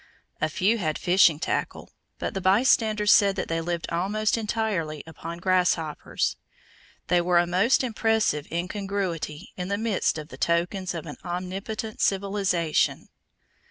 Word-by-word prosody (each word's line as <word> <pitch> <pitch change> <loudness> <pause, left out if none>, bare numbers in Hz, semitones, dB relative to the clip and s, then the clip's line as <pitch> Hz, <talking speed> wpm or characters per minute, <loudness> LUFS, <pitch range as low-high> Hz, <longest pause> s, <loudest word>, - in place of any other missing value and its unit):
A 155 - +1
few 205 +8 +1
had 155 -5 -1
fishing 175 -4 +4
tackle, - - -3 0.3
but - - -3
the 195 - -3
bystanders 215 +1 +3
said 200 -1 +5
that - - -3
they 165 0 0
lived 170 0 -3
almost 205 +5 0
entirely 210 -9 -2
upon 165 +1 -8
grasshoppers. 180 -4 0 0.7
They 175 -1 +3
were 175 0 +2
a 175 - +4
most 190 +10 +2
impressive 220 - 0
incongruity 180 -2 -3
in 180 -1 -3
the 200 +1 -1
midst 215 -6 0
of 155 0 -7
the - - -10
tokens 175 +2 0
of 165 - -5
an 150 - -8
omnipotent 190 +4 -5
civilization. 195 -5 +1
185 Hz, 140 wpm, -26 LUFS, 170-205 Hz, 0.7 s, said